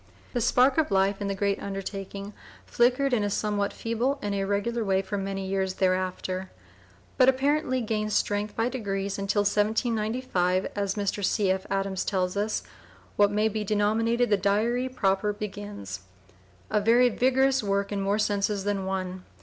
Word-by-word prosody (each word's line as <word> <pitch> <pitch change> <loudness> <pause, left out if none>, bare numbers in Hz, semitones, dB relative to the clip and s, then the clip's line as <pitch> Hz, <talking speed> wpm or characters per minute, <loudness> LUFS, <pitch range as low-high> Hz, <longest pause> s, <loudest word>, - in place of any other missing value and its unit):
The 245 - 0
spark 255 +6 +4
of 315 - +1
life 195 0 +2
in 200 - -1
the 195 - -1
great 200 0 0
undertaking 195 +1 -6 0.3
flickered 255 +3 +2
in 220 -4 +2
a 205 - 0
somewhat 205 0 -1
feeble 235 +5 -1
and 205 -4 -3
irregular 200 +4 -1
way 195 -1 +1
for 200 +2 -4
many 195 -1 -3
years 190 -1 -1
thereafter, 185 0 -1 0.7
but 255 0 +7
apparently 265 0 +1
gained 215 -1 -2
strength 205 0 0
by 225 +1 +1
degrees 200 -6 -3
until 200 +1 +1
in 215 +2 +1
1795, 185 -6 0
as 200 -1 -1
Mr. 205 0 -2
C. 195 0 +2
F. 190 0 -2
Adams 195 -1 -1
tells 185 -2 -1
us, 210 +2 -1 0.5
"what 205 0 +4
may 210 +1 +2
be 215 0 -2
denominated 220 +3 +1
the 205 - +5
diary 220 +6 +1
proper 205 -4 +1
begins," 205 - -6 0.7
a 210 - +2
very 240 +4 +5
vigorous 265 +2 +2
work 200 -1 -1
in 200 -1 -1
more 200 +1 +1
senses 205 -1 0
than 200 -1 -1
one. 185 -1 -3
205 Hz, 165 wpm, -27 LUFS, 195-225 Hz, 0.7 s, but